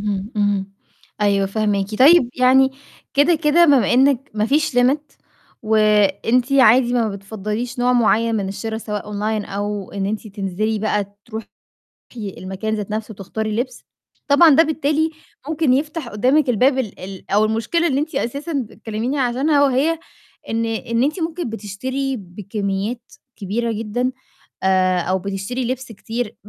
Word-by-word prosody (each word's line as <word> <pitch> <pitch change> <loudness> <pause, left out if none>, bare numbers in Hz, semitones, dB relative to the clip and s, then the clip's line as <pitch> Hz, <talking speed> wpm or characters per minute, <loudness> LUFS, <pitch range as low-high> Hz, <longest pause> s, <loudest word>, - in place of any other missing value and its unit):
إمم 205 +2 -3
إمم، 200 -1 0 0.5
أيوه 200 -1 +2
فاهماكِ. 205 0 -1
طيب 275 -2 +6
يعني 260 +1 +4 0.4
كده 295 +5 +4
كده 315 +2 +4
بمّا 280 -7 +4
إنِك 270 +1 +3
ما 215 +1 +1
فيش 285 -2 +1
limit 260 +4 +3 0.6
وأنتِ 215 +3 +2
عادي 245 -1 +5
ما 230 -3 +2
بتفضّليش 210 +4 -5
نوع 250 +1 +2
معين 230 -1 +2
من 195 -3 -1
الشرا 220 +3 -4
سواء 210 -2 -5
أونلاين 210 +1 -2
أو 205 0 -4
إن 195 -1 -2
أنتِ 215 +2 -3
تنزِلي 205 +2 -2
بقى 205 -1 -2
تروحي 225 -2 -7 0.7
المكان 195 +1 -4
ذات 210 -1 -5
نفسه 220 +1 -3
وتختاري 215 +2 -4
لِبس، 250 +1 -4 0.4
طبعًا 315 +4 +6
ده 325 - +7
بالتالي 315 0 0 0.4
ممكن 310 -4 +2
يفتح 300 0 -2
قِدامك 255 +7 +2
الباب 255 +4 +3
ال 225 -7 -3
ال 190 0 -9
أو 210 +2 +4
المشكلة 225 +10 0
اللي 275 - -1
إن - - +1
أنتِ 310 -3 -9
أساسًا 280 +6 -3 0.2
بتكلميني 225 +6 -4
عشانها 275 +4 +2
وهي 285 +5 +2 0.5
إن 230 0 0
إن 230 +1 -1
أنتِ 305 +7 -1
ممكن 325 -5 -3
بتشتري 255 +6 -4
بكميات 200 +3 -4 0.2
كبيرة 225 +3 -2
جدًا 225 +4 -2 0.5
آآ 185 -1 +3
أو 185 +2 0
بتشتري 200 +6 -4
لِبس 255 -1 -4
كتير، 225 +2 -5
225 Hz, 145 wpm, -20 LUFS, 205-265 Hz, 0.7 s, ده